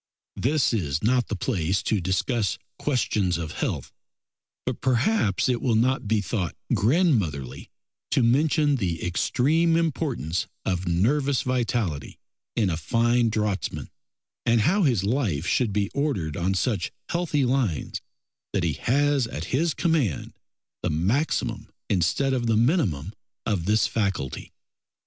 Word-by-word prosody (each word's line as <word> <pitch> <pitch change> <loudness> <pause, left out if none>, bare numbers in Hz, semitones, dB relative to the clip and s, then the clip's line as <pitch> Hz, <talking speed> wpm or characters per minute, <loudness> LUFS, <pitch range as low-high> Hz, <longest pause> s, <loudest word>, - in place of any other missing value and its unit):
This 140 0 +1
is 80 -9 -1
not 125 +2 +2
the 105 - -2
place 95 -4 -1
to 105 -2 0
discuss 95 +2 0 0.2
questions 105 - 0
of 80 -3 -4
health, - - -3 0.7
but - - -3
perhaps 130 - +2
it 125 -2 0
will 125 -5 +2
not 125 +1 +1
be 110 0 +2
thought 95 -4 -2 0.2
grandmotherly 105 - +1 0.4
to 130 - +2
mention 145 +4 +3
the 85 -7 -2
extreme 155 - +2
importance 135 - -1 0.2
of 90 -1 -1
nervous 130 - +2
vitality 120 - -1 0.4
in 110 - +2
a 80 - -1
fine 115 +6 +2
draughtsman, 105 -3 -2 0.5
and 115 -1 +3
how 190 - +3
his 125 - +2
life 100 - 0
should 110 +4 +1
be 100 0 -1
ordered 135 - -1
on 95 +2 0
such 95 -2 0 0.2
healthy 165 -5 0
lines 125 - -1 0.5
that 100 -3 0
he 80 -3 +1
has 140 - +1
at 80 -7 -5
his 160 +4 +1
command 155 - 0 0.5
the - - -1
maximum 110 - 0 0.2
instead 100 +9 +2
of 120 -2 0
the 110 -1 +3
minimum 110 - +1 0.3
of 95 -6 -1
this 105 +2 +3
faculty. 95 - -2
115 Hz, 135 wpm, -25 LUFS, 95-135 Hz, 0.7 s, mention